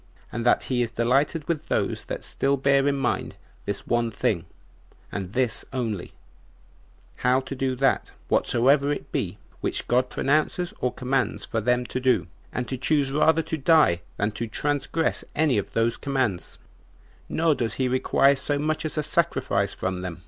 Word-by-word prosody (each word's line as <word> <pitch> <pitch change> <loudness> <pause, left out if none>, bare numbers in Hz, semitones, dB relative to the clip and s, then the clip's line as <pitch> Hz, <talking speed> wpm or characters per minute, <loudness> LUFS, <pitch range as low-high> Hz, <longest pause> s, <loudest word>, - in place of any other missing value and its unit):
And 115 - -3
that - - +4
he 125 -2 0
is 120 - 0
delighted 135 +7 +1
with 160 -2 -2
those - - -1
that - - -5
still 140 +1 0
bear 140 +1 +3
in 140 - +2
mind 135 - -1 0.3
this 100 -1 -3
one 120 -1 +1
thing, 110 - -1 0.7
and 95 -1 -5
this 125 -3 0
only, 115 -8 -3 1.0
how 125 +1 +3
to 135 - -7
do 130 -1 -1
that, 135 +1 +1 0.2
whatsoever 140 +4 +3
it 145 - -4
be, - - -2 0.2
which - - -2
God 125 +1 +2
pronounces 155 +5 0
or 125 - 0
commands 130 -3 -1
for 115 - -2
them 125 +2 +1
to 130 - -3
do, 125 -8 +2 0.3
and 125 -1 -3
to 130 - -3
choose 140 +1 +1
rather 160 +3 +3
to 160 - -3
die 140 - +4 0.2
than 105 +2 0
to 115 +2 -4
transgress 145 +7 -1
any 150 -8 +3
of 100 - -6
those 115 +1 +1
commands; 130 -10 -2 0.7
nor 165 -1 +2
does 115 -5 -2
he 130 +1 +1
require 135 +2 +3
so 145 +2 -1
much 155 +1 -1
as 155 - -2
a 150 - +1
sacrifice - - 0
from 95 0 -3
them. 90 -2 -5
130 Hz, 170 wpm, -25 LUFS, 115-145 Hz, 1.0 s, that